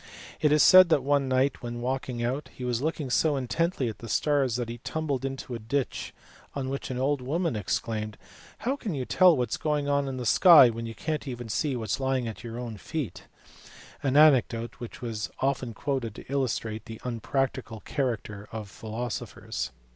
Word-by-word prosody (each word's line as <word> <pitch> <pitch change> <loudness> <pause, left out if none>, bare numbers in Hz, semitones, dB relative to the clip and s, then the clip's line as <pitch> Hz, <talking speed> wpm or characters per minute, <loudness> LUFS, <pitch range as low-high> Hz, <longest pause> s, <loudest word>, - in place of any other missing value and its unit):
It 150 - +3
is 150 0 +6
said 185 -2 +9
that, 145 -5 +3
one 140 0 +2
night, 130 +2 +1
when 120 -1 -5
walking 125 -1 -2
out, 130 +5 -2
he 125 - -7
was 120 -1 -1
looking 150 -3 -2
so 150 +3 +3
intently 135 +3 0
at 110 - -5
the 115 - -8
stars 140 -2 +2
that 120 -1 -2
he 120 +1 -6
tumbled 145 -1 -2
into 135 -2 -4
a 115 - -4
ditch, 130 +5 -2 0.4
on 135 -2 -2
which 135 0 -4
an 130 - -3
old 135 +1 +1
woman 160 +3 -1
exclaimed 110 +1 -2 0.2
" - - -21
How 265 +3 +1
can 215 - -4
you 130 -2 -2
tell 180 0 +5
what 125 -3 0
is - - 0
going 150 -2 -1
on 140 -1 +1
in 130 -1 -4
the 125 - -4
sky 150 - +8
when 115 0 -5
you 115 - -7
can 155 +7 -2
t 130 -4 -6
see 130 +6 0
what 110 -4 -4
is - - 0
lying 130 -2 0
at 110 - -7
your 115 0 -6
own 120 -3 -5
feet 140 - -5 0.4
?" - - -17 0.3
an 135 0 +1
anecdote 125 -6 +4
which 120 +1 -8
was 110 -3 -3
often 130 -2 0
quoted 125 -6 -2
to - - -11
illustrate 115 -5 -1
the 115 -1 -8
un 120 -2 -3
practical 130 -2 -2
character 110 -7 -3
of 110 -3 -6
philosophers. 110 - -5
130 Hz, 205 wpm, -27 LUFS, 115-140 Hz, 0.4 s, said